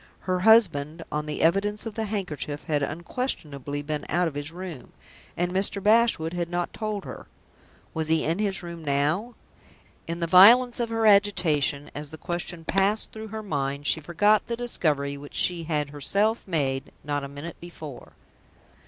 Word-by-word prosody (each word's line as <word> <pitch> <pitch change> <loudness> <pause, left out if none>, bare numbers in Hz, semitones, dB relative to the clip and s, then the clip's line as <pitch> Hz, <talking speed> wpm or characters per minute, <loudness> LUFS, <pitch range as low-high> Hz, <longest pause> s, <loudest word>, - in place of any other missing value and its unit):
Her 185 -1 -1
husband, 170 -7 +4
on 150 0 -2
the 150 - -2
evidence 200 +6 +2
of 225 - -5
the 220 +1 -2
handkerchief 170 -8 -4
had 150 -2 0
unquestionably 145 - -4
been 150 0 -3
out 175 0 +2
of 160 - -4
his 145 +2 -5
room 175 -6 -8 0.4
and 175 +1 0
Mr. 195 +2 +1
Bashwood 210 -6 +3
had 175 -1 -2
not 175 0 -2
told 215 -3 -4
her. - - -9 0.7
Was 160 -1 -1
he 160 0 +2
in 165 +5 0
his 195 -3 -1
room 170 -1 -8
now? 155 - 0 0.7
In 165 +1 -4
the 170 - 0
violence 235 +9 +7
of 235 -1 -1
her 225 -1 0
agitation, 175 -9 +3
as 150 0 -6
the 160 - -9
question 175 0 -4
passed 195 +4 +1
through 220 0 -8
her 220 +1 -6
mind, 140 -5 -2
she 160 - +2
forgot 205 +7 +2
the 235 -1 -3
discovery 150 -12 -1
which 145 +1 -11
she 175 -2 0
had 150 -3 -1
herself 200 - 0
made 135 -6 -1
not 145 -1 -2
a - - -4
minute 145 +4 -8
before. 160 -6 -10
170 Hz, 170 wpm, -26 LUFS, 150-205 Hz, 0.7 s, violence